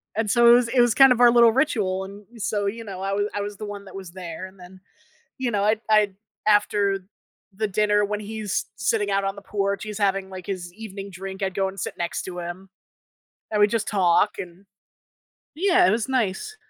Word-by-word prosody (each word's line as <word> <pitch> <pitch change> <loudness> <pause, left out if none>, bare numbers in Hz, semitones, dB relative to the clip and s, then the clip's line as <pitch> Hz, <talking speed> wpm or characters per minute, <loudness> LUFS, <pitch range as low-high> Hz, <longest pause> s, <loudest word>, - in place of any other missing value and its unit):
And, 220 -1 -1
so, 235 -1 +6
it - - +9
was 245 -1 +3
it 245 0 +3
was 240 -2 +3
kind 270 -1 +8
of 245 -1 +3
our 240 -1 +8
little 235 -1 +6
ritual 215 -8 0
and, 200 +2 -12 0.2
so, 205 0 -1
you 230 +3 -4
know, 190 -3 -7
I 195 +1 -2
wa 200 - 0
I 205 - -1
was 205 0 -5
the 215 - -6
one 205 -1 -7
that 190 -1 -12
was 190 -3 -8
there, 170 -1 -7
and 190 0 -19
then, 185 +1 -14 0.6
you 255 -2 -1
know, 205 -2 0
I'd 215 +1 +2
I'd 210 -2 +3 0.3
after 205 -1 +3 0.6
the 215 +2 -1
dinner, 210 +1 +2
when 210 0 -3
he's 215 -1 -3
sitting 205 +1 0
out 195 0 +1
on 195 0 -2
the 200 - -10
porch, 200 0 -2
he's 210 0 -6
having 195 -1 0
like 185 -2 -9
his 180 -3 -5
evening 200 -1 -8
drink, 190 +1 -7
I'd 190 -1 -1
go 195 -1 +1
and 195 +1 -10
sit - - -4
next 175 0 -3
to 180 -1 -6
him. 175 +3 -7 0.8
And 210 - 0
we'd 205 - +6
just 225 -2 -1
talk 190 0 +2
and 180 +2 -9 0.9
Yeah, 360 +2 +4
it - - +4
was 225 +3 -1
nice. 260 - -1
205 Hz, 225 wpm, -24 LUFS, 190-220 Hz, 0.9 s, it